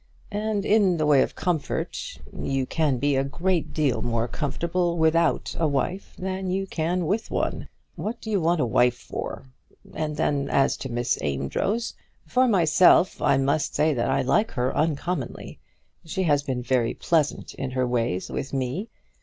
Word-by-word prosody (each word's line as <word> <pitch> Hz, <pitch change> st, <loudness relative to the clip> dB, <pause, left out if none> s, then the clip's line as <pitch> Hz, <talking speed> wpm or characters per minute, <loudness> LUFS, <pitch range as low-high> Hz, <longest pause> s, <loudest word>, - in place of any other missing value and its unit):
And 210 Hz, 0 st, -1 dB
in 200 Hz, -5 st, +4 dB
the 155 Hz, -, +1 dB
way 145 Hz, -3 st, +5 dB
of -, -, -1 dB
comfort, 170 Hz, -5 st, -2 dB, 0.2 s
you 135 Hz, -1 st, -1 dB
can 150 Hz, -2 st, 0 dB
be 145 Hz, +3 st, +1 dB
a 135 Hz, -, +2 dB
great 170 Hz, +5 st, -1 dB
deal 150 Hz, -6 st, 0 dB
more 115 Hz, 0 st, 0 dB
comfortable 170 Hz, +6 st, -1 dB
without 160 Hz, +1 st, +2 dB
a 165 Hz, -, +3 dB
wife 150 Hz, +7 st, -2 dB
than 190 Hz, 0 st, -3 dB
you 195 Hz, +1 st, 0 dB
can 175 Hz, 0 st, -1 dB
with 205 Hz, +8 st, -1 dB
one. -, -, -2 dB, 0.3 s
What 225 Hz, +3 st, -4 dB
do 220 Hz, -, -6 dB
you 200 Hz, -3 st, +2 dB
want 170 Hz, +1 st, +2 dB
a -, -, +2 dB
wife 120 Hz, +1 st, +3 dB
for? -, -, -6 dB, 0.5 s
And 155 Hz, -1 st, -3 dB
then, 140 Hz, -1 st, 0 dB
as 135 Hz, -, +3 dB
to 135 Hz, -, -6 dB
Miss 120 Hz, 0 st, 0 dB
Amedroz, 80 Hz, -, -1 dB, 0.3 s
for 255 Hz, 0 st, +3 dB
myself 180 Hz, -2 st, +4 dB
I -, -, +4 dB
must 140 Hz, +3 st, 0 dB
say 155 Hz, 0 st, +3 dB
that 120 Hz, 0 st, 0 dB
I 135 Hz, 0 st, +2 dB
like 215 Hz, -, +2 dB
her 125 Hz, -1 st, -1 dB
uncommonly. 160 Hz, +4 st, -2 dB, 0.4 s
She 185 Hz, +3 st, -2 dB
has 145 Hz, -4 st, +3 dB
been 130 Hz, -3 st, -3 dB
very 125 Hz, -2 st, +1 dB
pleasant 155 Hz, -4 st, 0 dB
in 135 Hz, -, -4 dB
her 130 Hz, 0 st, 0 dB
ways 115 Hz, -7 st, -1 dB
with 140 Hz, -1 st, -4 dB
me. 135 Hz, -, -2 dB
155 Hz, 170 wpm, -25 LUFS, 135-180 Hz, 0.5 s, way